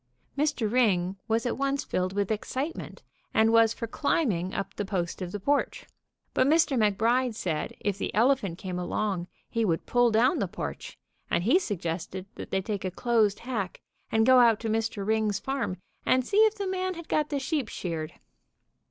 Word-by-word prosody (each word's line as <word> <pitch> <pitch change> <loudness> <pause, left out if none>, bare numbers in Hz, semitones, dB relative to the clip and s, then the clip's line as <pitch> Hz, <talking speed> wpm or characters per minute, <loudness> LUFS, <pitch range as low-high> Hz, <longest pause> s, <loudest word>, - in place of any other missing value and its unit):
Mr. 290 -5 +1
Ring 195 -7 +2
was 225 +1 +1
at 245 - -2
once 275 0 0
filled 185 0 -1
with 200 +1 -1
excitement, 265 +8 -4 0.3
and 220 0 +5
was 230 -1 +6
for 230 - -4
climb 285 +3 +1
ing 180 +1 -2
up 195 0 -4
the - - -3
post 190 -3 -3
of 180 -1 -4
the 205 - -4
porch, 285 +8 0 0.5
but 255 - +3
Mr. 315 -1 +4
McBride 230 +3 +2
said 160 -7 -3
if 200 -1 -2
the - - -2
elephant 220 -6 +2
came 180 -1 -4
along 180 0 -2 0.2
he 230 - -1
would 165 -6 0
pull 245 -1 +3
down 240 +8 +3
the 200 - 0
porch, 70 - -6 0.3
and 175 - +1
he 255 - +5
suggested 185 - -4
that - - -8
they 190 0 0
take 205 -1 -3
a 185 - -1
closed 215 0 +1
hack 225 -7 -3 0.3
and 220 0 +3
go 255 0 +7
out 230 -3 +5
to 225 - -2
Mr. 220 -2 -1
Ring's 215 -1 +1
farm 265 -7 -2 0.3
and 255 -1 +2
see 415 +7 +4
if 435 - -3
the 405 -2 -3
man 370 -1 -2
had 335 -1 -9
got 300 -1 +1
the 285 - -1
sheep 275 -2 -1
sheared. 165 -6 -4
220 Hz, 190 wpm, -28 LUFS, 190-260 Hz, 0.5 s, go